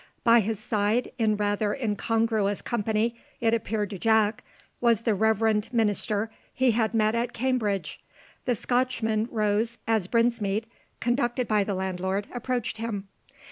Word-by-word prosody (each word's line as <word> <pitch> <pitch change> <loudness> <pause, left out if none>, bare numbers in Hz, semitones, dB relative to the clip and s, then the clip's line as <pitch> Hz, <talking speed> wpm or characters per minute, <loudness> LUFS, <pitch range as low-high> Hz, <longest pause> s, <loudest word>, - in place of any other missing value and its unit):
By 235 0 +6
his 220 0 -1
side, 215 +3 0
in 215 -2 +2
rather 205 0 0
incongruous 220 -3 0
company, 225 +1 -1 0.2
it 225 -1 +2
appeared 220 -2 -1
to 195 - -6
Jack, 220 0 +2 0.4
was 235 -3 +3
the 230 -2 +1
reverend 220 +1 +2
minister 215 -1 0 0.2
he 260 -1 +2
had 225 0 0
met 215 0 +3
at 235 +1 -1
Cambridge. 220 -9 -1 0.4
The 245 - +2
Scotchman 230 -2 0
rose 220 +1 0
as 220 -5 +1
Brinsmead, 230 -2 +1 0.3
conducted 240 0 0
by 210 -2 +3
the 200 0 -2
landlord, 190 +1 -2
approached 245 -2 -2
him. 210 -3 -4
220 Hz, 140 wpm, -26 LUFS, 205-235 Hz, 0.4 s, By